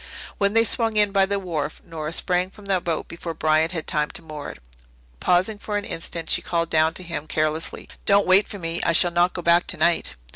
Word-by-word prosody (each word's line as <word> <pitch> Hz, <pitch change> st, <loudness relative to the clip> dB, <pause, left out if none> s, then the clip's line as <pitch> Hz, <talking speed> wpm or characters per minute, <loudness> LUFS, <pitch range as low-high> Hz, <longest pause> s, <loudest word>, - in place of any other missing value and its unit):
When 200 Hz, 0 st, +2 dB
they 225 Hz, 0 st, +5 dB
swung 225 Hz, 0 st, +2 dB
in 210 Hz, -1 st, +3 dB
by 195 Hz, -1 st, +3 dB
the 200 Hz, 0 st, 0 dB
wharf 160 Hz, -6 st, -4 dB
Nora 155 Hz, -2 st, -5 dB
sprang 180 Hz, +1 st, 0 dB
from 205 Hz, +1 st, -16 dB
the 190 Hz, -2 st, +1 dB
boat 165 Hz, -2 st, -3 dB
before 170 Hz, -1 st, -6 dB
Bryant 155 Hz, +1 st, +2 dB
had 160 Hz, -4 st, -4 dB
time 150 Hz, -1 st, -1 dB
to -, -, -16 dB
moor 155 Hz, -2 st, -7 dB
it. -, -, -10 dB, 0.6 s
Pausing 185 Hz, -, +1 dB
for 205 Hz, 0 st, -3 dB
an 205 Hz, -, -4 dB
instant, 165 Hz, 0 st, -5 dB
she -, -, +2 dB
called 170 Hz, -1 st, -2 dB
down 160 Hz, +1 st, +3 dB
to 185 Hz, -, -5 dB
him, 160 Hz, -3 st, -5 dB
carelessly, 155 Hz, +1 st, -2 dB, 0.2 s
"Don't 200 Hz, 0 st, +5 dB
wait 190 Hz, +2 st, +5 dB
for 205 Hz, -, -6 dB
me. 165 Hz, -2 st, -2 dB
I 165 Hz, -, +1 dB
shall 175 Hz, +1 st, +5 dB
not 175 Hz, +1 st, +2 dB
go 175 Hz, -, -5 dB
back 170 Hz, +1 st, +4 dB
tonight." 170 Hz, 0 st, +1 dB
170 Hz, 225 wpm, -23 LUFS, 160-195 Hz, 0.6 s, they